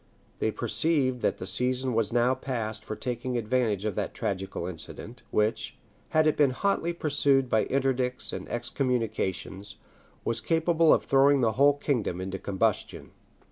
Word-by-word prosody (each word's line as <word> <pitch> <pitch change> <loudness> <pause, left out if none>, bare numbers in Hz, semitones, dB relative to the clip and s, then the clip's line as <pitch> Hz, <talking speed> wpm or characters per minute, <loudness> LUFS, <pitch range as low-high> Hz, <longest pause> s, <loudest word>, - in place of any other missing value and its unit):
They - - +1
perceived 130 +4 +1
that - - 0
the - - -6
season 130 0 0
was 115 -2 +1
now 120 +2 +3
past 120 -5 -4
for 110 - -5
taking 125 +1 -3
advantage 110 -3 0
of 105 - -1
that - - -3
tragical 95 -3 -3
incident; 90 +7 -8
which, 105 +1 0 0.3
had 155 0 +3
it 155 - +3
been 145 -2 +4
hotly 170 +5 0
pursued 145 -5 +2
by 110 - +3
interdicts 130 -2 -1
and - - -6
excommunications, 115 -6 -2 0.5
was 115 0 0
capable 165 0 +3
of - - +3
throwing 135 0 +4
the 115 -2 +3
whole 140 +4 +4
kingdom 120 - -1
into 95 +1 -4
combustion. 100 +2 -1
125 Hz, 150 wpm, -27 LUFS, 110-135 Hz, 0.5 s, been